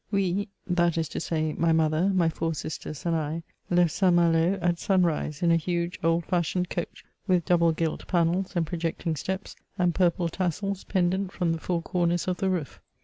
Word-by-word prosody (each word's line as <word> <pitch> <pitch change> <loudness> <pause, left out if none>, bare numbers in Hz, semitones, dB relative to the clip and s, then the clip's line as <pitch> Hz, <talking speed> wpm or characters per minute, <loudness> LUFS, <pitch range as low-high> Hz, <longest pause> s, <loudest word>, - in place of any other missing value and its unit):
We, 200 0 0 0.2
that 175 -3 +1
is 160 -1 0
to - - -4
say, 155 -1 -1
my 165 -1 +2
mother, 160 +3 +2
my 185 -4 +3
four 165 0 -1
sisters 155 0 -6
and 170 -1 +1
I, 160 +1 -2 0.3
left 175 -2 +3
St. 185 +2 +3
Malo 170 +2 +3
at 175 -1 0
sunrise, 170 -5 +1
in 170 - +4
a 165 - +5
huge 170 +1 -2
old 165 0 +2
fashioned 180 0 0
coach, 175 - -5 0.2
with 180 -4 +2
double 170 -2 +4
gilt 160 0 -2
pannels 180 +2 +1
and 170 -1 +1
projecting 165 0 -2
steps 190 +6 -4 0.2
and 180 -2 +2
purple 175 -1 +2
tassels 185 +3 -2
pendent 190 0 0
from 175 -3 0
the 165 - -4
four 170 0 -2
comers 175 0 0
of 180 -1 0
the 190 - 0
roof. 175 -6 -3
170 Hz, 190 wpm, -27 LUFS, 165-180 Hz, 0.3 s, a